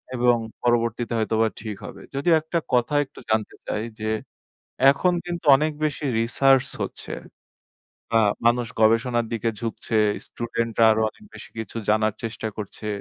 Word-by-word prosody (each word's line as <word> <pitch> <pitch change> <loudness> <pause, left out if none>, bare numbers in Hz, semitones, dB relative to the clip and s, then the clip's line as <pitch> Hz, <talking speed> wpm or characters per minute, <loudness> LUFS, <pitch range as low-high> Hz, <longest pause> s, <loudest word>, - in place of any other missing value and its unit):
এবং 120 0 +4 0.3
পরবর্তীতে 120 0 +1
হয়তোবা 110 0 +2
ঠিক 110 -2 -5
হবে। - - -9
যদিও 165 +5 +3
একটা 165 +2 -1
কথা 125 +4 +2
একটু - - -16
জানতে 110 -1 0
চাই 105 - -2 0.2
যে, 110 0 -1 0.8
এখন 180 +6 +2
কিন্তু 175 -2 -5
অনেক 155 +2 0
বেশি 150 0 -2 0.2
research 135 +3 +3
হচ্ছে। - - -5 1.0
আ - - +6 0.3
মানুষ 120 0 +3
গবেষণার 115 +2 +3
দিকে 115 0 0
ঝুঁকছে। 115 -1 -2 0.3
স্টুডেন্টরা 115 -1 0
আরো 110 0 +2
অনেক 215 - -20
বেশি - - -10
কিছু 110 +1 -5
জানার 110 0 +3
চেষ্টা 110 0 -4
করছে। 105 +1 -6
115 Hz, 145 wpm, -24 LUFS, 110-135 Hz, 1.0 s, আ